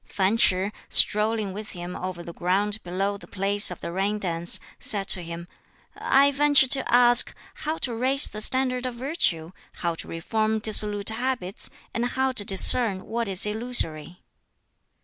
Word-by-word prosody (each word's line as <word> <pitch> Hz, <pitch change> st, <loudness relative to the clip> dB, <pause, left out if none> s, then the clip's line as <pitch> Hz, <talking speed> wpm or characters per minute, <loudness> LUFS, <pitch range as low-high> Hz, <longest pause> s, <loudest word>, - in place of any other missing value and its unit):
Fan 195 Hz, +2 st, -1 dB
Ch'i, 190 Hz, -2 st, +1 dB, 0.2 s
strolling 210 Hz, -1 st, +3 dB
with 215 Hz, +2 st, -9 dB
him 175 Hz, 0 st, -8 dB
over 180 Hz, -2 st, -7 dB
the 170 Hz, -, -10 dB
ground 200 Hz, +5 st, -2 dB
below 195 Hz, +3 st, -3 dB
the -, -, -15 dB
place 200 Hz, +1 st, +2 dB
of 180 Hz, -, -8 dB
the -, -, -6 dB
rain 195 Hz, +4 st, -2 dB
dance, 175 Hz, -3 st, 0 dB, 0.2 s
said 200 Hz, -2 st, -3 dB
to 185 Hz, -, +5 dB
him, 170 Hz, 0 st, -8 dB, 0.5 s
"I 280 Hz, +1 st, +2 dB
venture 285 Hz, -1 st, +3 dB
to 270 Hz, -1 st, +3 dB
ask 240 Hz, 0 st, +4 dB, 0.2 s
how 310 Hz, +1 st, -5 dB
to 245 Hz, -, -6 dB
raise 260 Hz, +4 st, 0 dB
the 215 Hz, -, -7 dB
standard 255 Hz, +1 st, +1 dB
of 250 Hz, -, -7 dB
virtue, 235 Hz, -, -2 dB, 0.2 s
how 170 Hz, -1 st, -3 dB
to 165 Hz, -, -8 dB
reform 215 Hz, +6 st, -2 dB
dissolute 210 Hz, -1 st, +2 dB
habits, 225 Hz, -4 st, -4 dB, 0.2 s
and 235 Hz, -, -2 dB
how 265 Hz, +1 st, -1 dB
to 230 Hz, -5 st, -1 dB
discern 195 Hz, +1 st, +4 dB
what 235 Hz, 0 st, -4 dB
is 195 Hz, 0 st, +4 dB
illusory?" 210 Hz, -7 st, -1 dB
210 Hz, 165 wpm, -24 LUFS, 185-245 Hz, 0.5 s, to